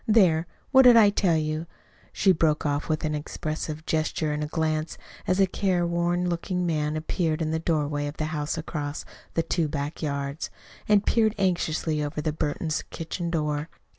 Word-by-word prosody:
There! 180 Hz, -7 st, +4 dB, 0.2 s
What 265 Hz, -1 st, +8 dB
did 245 Hz, -2 st, +8 dB
I 210 Hz, -3 st, +7 dB
tell 180 Hz, -5 st, +2 dB
you?" 155 Hz, +1 st, -2 dB, 0.4 s
she 190 Hz, -, +3 dB
broke 155 Hz, -3 st, +2 dB
off, 145 Hz, +1 st, -1 dB
with 155 Hz, 0 st, 0 dB
an 155 Hz, -, -1 dB
expressive 155 Hz, +1 st, -4 dB
gesture 155 Hz, 0 st, 0 dB
and 150 Hz, 0 st, -2 dB
glance, 155 Hz, -1 st, -1 dB, 0.3 s
as 185 Hz, +1 st, +2 dB
a 195 Hz, -, +6 dB
careworn 175 Hz, -2 st, 0 dB
looking 180 Hz, +1 st, -1 dB
man 155 Hz, -2 st, 0 dB
appeared 160 Hz, 0 st, -1 dB
in 155 Hz, -1 st, -1 dB
the 160 Hz, -, 0 dB
doorway 150 Hz, -3 st, 0 dB
of 145 Hz, -, -7 dB
the 155 Hz, -, -1 dB
house 150 Hz, +1 st, -2 dB
across 150 Hz, -2 st, -4 dB, 0.3 s
the 165 Hz, -, +2 dB
two 165 Hz, -2 st, 0 dB
back 145 Hz, 0 st, -4 dB
yards, 140 Hz, 0 st, -3 dB, 0.4 s
and 210 Hz, -1 st, +4 dB
peered 220 Hz, -2 st, +3 dB
anxiously 165 Hz, -5 st, 0 dB
over 145 Hz, +1 st, -4 dB
at 150 Hz, -, -1 dB
the 155 Hz, -1 st, 0 dB
Burtons' 155 Hz, +1 st, -1 dB
kitchen 170 Hz, +1 st, -4 dB
door. 150 Hz, -2 st, -1 dB
160 Hz, 175 wpm, -26 LUFS, 150-175 Hz, 0.4 s, What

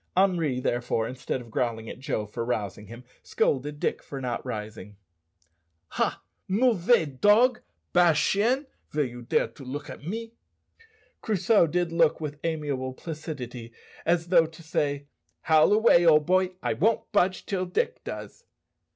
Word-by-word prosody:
Henri, 170 Hz, -9 st, +2 dB
therefore, 120 Hz, -2 st, -1 dB
instead 130 Hz, +1 st, -4 dB
of 115 Hz, -2 st, -13 dB
growling 115 Hz, -1 st, -2 dB
at -, -, -8 dB
Joe 110 Hz, -5 st, -2 dB
for 115 Hz, +3 st, -5 dB
rousing 105 Hz, -3 st, -3 dB
him, 115 Hz, +3 st, -11 dB, 0.2 s
scolded 145 Hz, +2 st, -1 dB
Dick -, -, -1 dB
for 140 Hz, -, -7 dB
not 125 Hz, -2 st, -3 dB
rising. 105 Hz, -4 st, -7 dB, 0.9 s
"Ha, -, -, -1 dB, 0.2 s
mauvais 215 Hz, -2 st, +3 dB
dog! 210 Hz, -, +3 dB, 0.3 s
bad 175 Hz, -3 st, +5 dB
chien! 220 Hz, -, +2 dB, 0.2 s
vill 150 Hz, -1 st, 0 dB
you 120 Hz, -1 st, -8 dB
dare 120 Hz, -, +1 dB
to 140 Hz, -, -13 dB
look 135 Hz, +3 st, -6 dB
to -, -, -9 dB
me?" 225 Hz, +8 st, -6 dB, 0.9 s
Crusoe 210 Hz, -2 st, +3 dB
did 175 Hz, +1 st, -1 dB
look 165 Hz, -2 st, +3 dB
with 150 Hz, -2 st, -5 dB
amiable 145 Hz, -5 st, -2 dB
placidity, 130 Hz, -7 st, -7 dB, 0.3 s
as 170 Hz, 0 st, +1 dB
though 170 Hz, -3 st, +5 dB
to 165 Hz, +1 st, -14 dB
say, 145 Hz, -3 st, -1 dB, 0.4 s
"Howl 155 Hz, +3 st, +4 dB
away, 210 Hz, -5 st, +5 dB
old 155 Hz, -3 st, +5 dB
boy, 185 Hz, +1 st, +2 dB
I -, -, +1 dB
won't 225 Hz, +2 st, 0 dB
budge 185 Hz, +1 st, +1 dB
till 185 Hz, -2 st, -2 dB
Dick 325 Hz, -, -1 dB
does." 485 Hz, -, -8 dB
155 Hz, 150 wpm, -26 LUFS, 125-185 Hz, 0.9 s, bad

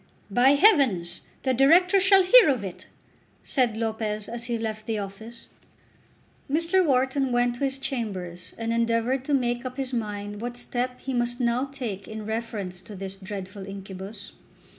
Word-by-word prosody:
"By 250 Hz, +6 st, +5 dB
heavens, 265 Hz, -, +3 dB, 0.2 s
the 260 Hz, -, +2 dB
Directors 355 Hz, -, +5 dB
shall 390 Hz, 0 st, +6 dB
hear 430 Hz, +1 st, +7 dB
of 255 Hz, -7 st, +1 dB
it!" 185 Hz, -3 st, -7 dB, 0.6 s
said 245 Hz, -5 st, +1 dB
Lopez 220 Hz, -2 st, -2 dB
as 235 Hz, 0 st, -5 dB
he 235 Hz, -1 st, -1 dB
left 220 Hz, -1 st, -5 dB
the 225 Hz, -1 st, -1 dB
office. 210 Hz, +4 st, -8 dB, 1.0 s
Mr. 335 Hz, +5 st, +2 dB
Wharton 265 Hz, -2 st, +1 dB
went 245 Hz, 0 st, +2 dB
to 280 Hz, -, -4 dB
his 270 Hz, 0 st, -2 dB
chambers 200 Hz, -10 st, -4 dB
and 230 Hz, 0 st, -2 dB
endeavoured 230 Hz, +3 st, +1 dB
to 290 Hz, -, -1 dB
make 240 Hz, -2 st, 0 dB
up 255 Hz, 0 st, -6 dB
his 265 Hz, -1 st, -3 dB
mind 205 Hz, -2 st, -4 dB
what 240 Hz, +1 st, -5 dB
step 250 Hz, +1 st, -3 dB
he 265 Hz, -, -4 dB
must 240 Hz, 0 st, -1 dB
now 245 Hz, +1 st, +1 dB
take 240 Hz, -9 st, -6 dB
in 220 Hz, -1 st, -7 dB
reference 215 Hz, -5 st, -4 dB
to 210 Hz, -, -11 dB
this 195 Hz, 0 st, -6 dB
dreadful 195 Hz, 0 st, -7 dB
incubus. 195 Hz, +1 st, -8 dB
235 Hz, 160 wpm, -26 LUFS, 205-265 Hz, 1.0 s, hear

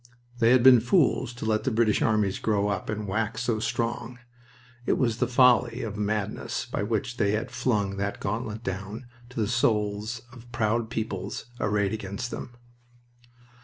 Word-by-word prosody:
They 115 Hz, -, +5 dB
had 125 Hz, -1 st, +5 dB
been 130 Hz, -2 st, +9 dB
fools 130 Hz, 0 st, +2 dB
to 120 Hz, -, -6 dB
let 110 Hz, -1 st, +1 dB
the -, -, +1 dB
British 110 Hz, -3 st, +2 dB
armies 105 Hz, -3 st, +1 dB
grow 105 Hz, -2 st, +1 dB
up 100 Hz, -2 st, -3 dB
and 105 Hz, -1 st, -3 dB
wax 110 Hz, +4 st, -1 dB
so 115 Hz, -2 st, 0 dB
strong. 120 Hz, +2 st, -2 dB, 0.7 s
It -, -, +3 dB
was 115 Hz, -3 st, +1 dB
the -, -, +1 dB
folly 125 Hz, -1 st, +4 dB
of 110 Hz, -3 st, -4 dB
the 105 Hz, -, -4 dB
madness 105 Hz, -1 st, -2 dB
by -, -, -3 dB
which 120 Hz, +4 st, -2 dB
they 100 Hz, -2 st, +2 dB
had 110 Hz, +2 st, -2 dB
flung 100 Hz, -5 st, 0 dB
the 100 Hz, +1 st, -2 dB
gauntlet 110 Hz, +2 st, -3 dB
down 100 Hz, +5 st, -5 dB, 0.2 s
to 125 Hz, -, -6 dB
the 105 Hz, -, +1 dB
souls 110 Hz, -1 st, 0 dB
of 120 Hz, -1 st, -14 dB
proud 115 Hz, 0 st, 0 dB
peoples 110 Hz, -5 st, -4 dB
arrayed 100 Hz, -1 st, +1 dB
against 110 Hz, +3 st, -4 dB
them. 120 Hz, -, -7 dB
110 Hz, 170 wpm, -27 LUFS, 105-120 Hz, 0.7 s, been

